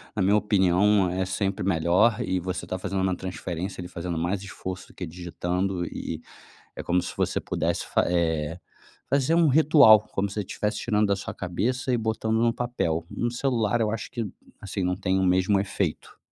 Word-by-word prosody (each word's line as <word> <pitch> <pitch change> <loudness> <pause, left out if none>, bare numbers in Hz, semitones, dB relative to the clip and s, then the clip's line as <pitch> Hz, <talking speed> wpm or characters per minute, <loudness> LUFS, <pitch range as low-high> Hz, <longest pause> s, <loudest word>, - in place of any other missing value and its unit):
na 105 - 0
minha 100 +3 +4
opinião 100 -1 +3
é 95 +1 -1
sempre 95 0 -2
melhor, 95 +5 +3
e 95 - 0
você 90 0 -4
tá 95 - -4
fazendo 95 0 -2
uma 95 -1 +1
transferência, 90 +1 -5
ali 90 - -7
fazendo 85 -1 -4
mais 90 +4 -1
esforço 95 0 -7
do - - -18
que 90 - -5
digitando 90 +2 -3
e 85 - -5
e - - -17 0.6
é - - -4
como 90 +1 +1
se - - -6
você - - 0
pudesse - - -1
fa - - +2
eh, 80 -2 0 0.5
fazer 140 +3 +2
um 170 -2 +5
ritual. 145 -7 +7
Como 100 +1 -1
se 100 - -9
você - - -1
estivesse 105 +2 -3
tirando 105 -2 +1
da 100 - +2
sua 100 - -6
cabeça 120 +9 -2
e - - +3
botando 110 0 -1
num 115 0 +3
papel. 85 -10 -2
No 120 - -1
celular 120 -3 0
eu 105 -1 +1
acho 115 - -4
que, 120 -3 -3 0.4
assim, 100 -1 -3
não 90 0 0
tem 95 0 0
o 95 - +1
mesmo 95 +2 +3
efeito. 95 -4 -3
95 Hz, 200 wpm, -26 LUFS, 90-110 Hz, 0.6 s, ritual